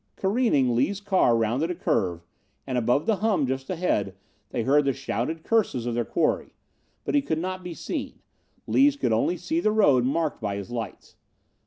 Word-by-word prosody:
Careening, 190 - +2
Lees' 185 +12 +1
car 190 - +3
rounded 120 +9 0
a 180 - -2
curve, 85 - -1 0.4
and, 130 - -3
above 125 +4 +1
the 220 -3 +2
hum 205 -9 +1
just 130 +1 -3
ahead, 160 - -1 0.3
they 120 - -2
heard 145 +4 +4
the 135 - +2
shouted 160 +8 -3
curses 200 - +1
of 120 - -2
their 120 0 0
quarry. 160 +6 -1 0.5
But - - -2
he 290 - +4
could 160 - -2
not 185 +2 -4
be 175 -2 -6
seen. - - -5 0.5
Lees 280 +1 +4
could 120 - 0
only 170 +11 +1
see 320 - -1
the 215 - +2
road 145 - +4
marked 150 +3 -1
by 100 -2 -2
his 100 +3 -6
lights. 115 -2 -6
145 Hz, 185 wpm, -25 LUFS, 120-190 Hz, 0.5 s, heard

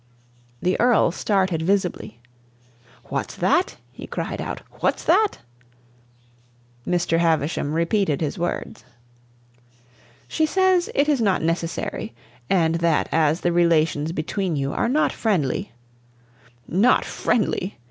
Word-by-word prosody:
The 180 - +1
Earl 240 -7 +4
started 190 -3 0
visibly. 180 - -1 0.9
"What's - - -3
that?" 365 +1 +1
he - - -10
cried - - -4
out. - - -5 0.2
"What's - - 0
that?" 430 -2 +3 1.5
Mr. 175 -2 +1
Havisham 160 -3 0
repeated 170 -2 +1
his 160 +4 -3
words. 175 0 -4 1.4
"She 315 -1 0
says 375 0 +2
it 285 +1 +3
is 290 -5 +2
not 195 -7 +1
necessary, 165 -6 -3 0.3
and 165 -3 +2
that 170 -2 +1
as 160 0 +2
the 175 - +1
relations 165 -3 +2
between 175 +2 -2
you 140 -1 -2
are - - 0
not 300 +4 +2
friendly 195 - -1 0.6
" 120 0 -31 0.2
"Not - - +4
friendly!" 210 -4 -1
170 Hz, 115 wpm, -23 LUFS, 160-205 Hz, 1.5 s, Earl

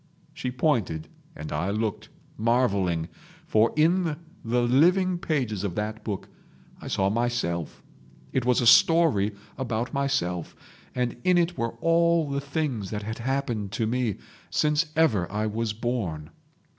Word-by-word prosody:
She 155 -5 -4
pointed, 120 - 0 0.3
and 75 0 -7
I 80 +6 -1
looked, 105 0 -2 0.3
marvelling, 100 -8 +1 0.4
for 110 +1 +3
in 165 +1 +2 0.3
the 120 +1 +1
living 175 +9 +3
pages 125 - -1
of 95 -4 -3
that 110 +1 -3
book 100 -4 -4 0.5
I - - -8
saw 95 0 +1
myself; 110 -9 -2 0.5
it 130 - +1
was 125 0 +2
a - - 0
story 120 -5 +5 0.3
about 120 -1 -2
myself, 135 - -1 0.4
and 125 -1 -1
in 180 -1 +4
it 175 0 +1
were 115 -4 -2
all 170 -1 +3
the 140 0 -1
things 140 - -2
that 105 -1 -4
had 110 +3 -5
happened 120 -5 -2
to 115 - 0
me 120 -2 0 0.3
since 150 +2 +2
ever 110 - +2
I 105 +1 -1
was 110 +1 -1
born 105 -10 -3
120 Hz, 145 wpm, -26 LUFS, 105-145 Hz, 0.5 s, story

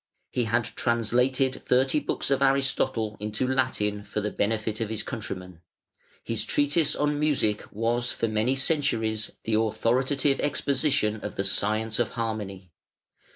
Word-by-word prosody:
He 125 - 0
had 115 +2 +1
translated 125 +3 +1
thirty 130 +4 +3
books 145 - -2
of 135 0 +2
Aristotle 135 -5 +1
into 105 +4 -2
Latin 115 -6 0
for 105 +1 -4
the 105 0 -2
benefit 110 +1 -1
of 110 - -1
his 110 -1 -3
countrymen; 90 -7 -6 0.6
his 115 -2 -1
treatise 145 +5 +2
on 150 0 0
Music 140 -9 0
was 120 +3 0
for 115 - -1
many 110 +4 +1
centuries 115 -7 0
the 110 - -2
authoritative 130 +6 +1
exposition 140 -6 +1
of 105 -1 -7
the 100 - -1
science 110 +3 +1
of 120 - 0
harmony. 100 -5 -4
115 Hz, 140 wpm, -26 LUFS, 105-135 Hz, 0.6 s, thirty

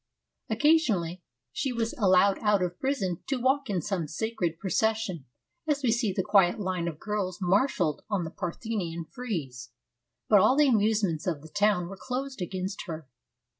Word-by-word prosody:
Occasionally 220 - +2 0.3
she 270 - -1
was 230 -1 -1
allowed 195 -1 +4
out 210 -3 +2
of 175 0 -3
prison 205 - -1
to 270 -2 -1
walk 265 +1 +1
in 185 -5 -1
some 180 -5 -2
sacred 175 -1 -2
pro 190 +1 -5
cession, 220 -9 0 0.4
as 290 -2 0
we 240 - +3
see 230 -3 +1
the 190 0 -1
quiet 195 +1 +4
line 185 -3 -2
of 160 -3 -4
girls 200 -4 -2
marshalled 190 - +1
on 200 -4 0
the 160 - -5
Parthenon 175 -3 -4
frieze, 145 - -5 0.6
but 210 - +6
all 235 +8 +4
the 300 -1 +5
amusements 210 - +1
of 155 -5 -2
the 160 - -11
town 205 -2 +2
were 195 +2 -8
closed 260 -2 -4
against 185 +2 -4
her. 160 -4 -6
200 Hz, 170 wpm, -28 LUFS, 175-230 Hz, 0.6 s, but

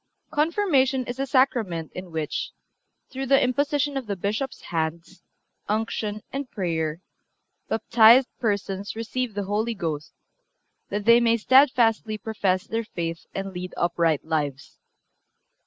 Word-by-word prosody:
Confirmation 295 -5 +2
is 245 +2 -6
a 275 - -1
Sacrament 235 - +1
in 185 0 -7
which, 160 -2 -3 0.6
through 270 0 -4
the 275 +1 +5
imposition 285 +2 +1
of 260 -4 -5
the 200 - -2
Bishop's 215 +8 -3
hands, 165 +2 -4 0.5
unction 215 -1 -2
and 275 -1 -4
prayer, 165 -4 -2 0.7
baptized 230 +3 +6
persons 200 -2 -2
receive 230 0 -3
the 205 - -1
Holy 215 +4 -1
Ghost, 155 -6 -4 0.8
that 205 0 -3
they 235 +1 +7
may 230 -1 +3
steadfastly 230 -3 +4
profess 195 -3 -1
their 225 +1 -2
faith 165 -6 -5
and 195 0 -4
lead 180 0 -6
upright 170 -3 +1
lives. 150 -3 -3
215 Hz, 125 wpm, -25 LUFS, 180-255 Hz, 0.8 s, they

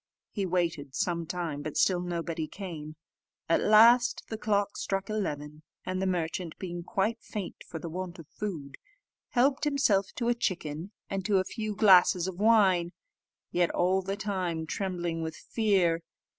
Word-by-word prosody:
He 200 -3 -2
waited 165 -6 -1
some 170 -2 -1
time, 170 -4 -3
but 155 0 -5
still 180 -2 +3
nobody 170 -2 -3
came: 155 -6 -7 0.5
at 165 - +3
last 235 +4 +6
the 220 - -4
clock 205 -2 0
struck 195 +1 -2
eleven, 150 -7 -3 0.2
and 185 0 -2
the 190 - +1
merchant, 175 -1 -2
being 175 -2 -5
quite 215 +5 -1
faint 205 -4 -6
for - - -6
the 165 - -6
want 180 +2 -5
of 165 -4 -11
food, 160 -10 -6 0.5
helped 265 +3 +2
himself 270 -10 +2
to 235 - -2
a 240 - +4
chicken, 175 -5 -3 0.2
and 195 -1 -3
to 205 -2 +3
a 185 - +3
few 215 +1 -4
glasses 185 -3 +6
of 185 -1 -6
wine, 195 -6 +4 0.6
yet 175 -1 +2
all 185 +2 +2
the 195 +1 -3
time 185 -5 -2
trembling 175 -2 -3
with 160 -1 -4
fear. 190 -7 +1
185 Hz, 160 wpm, -29 LUFS, 170-205 Hz, 0.6 s, last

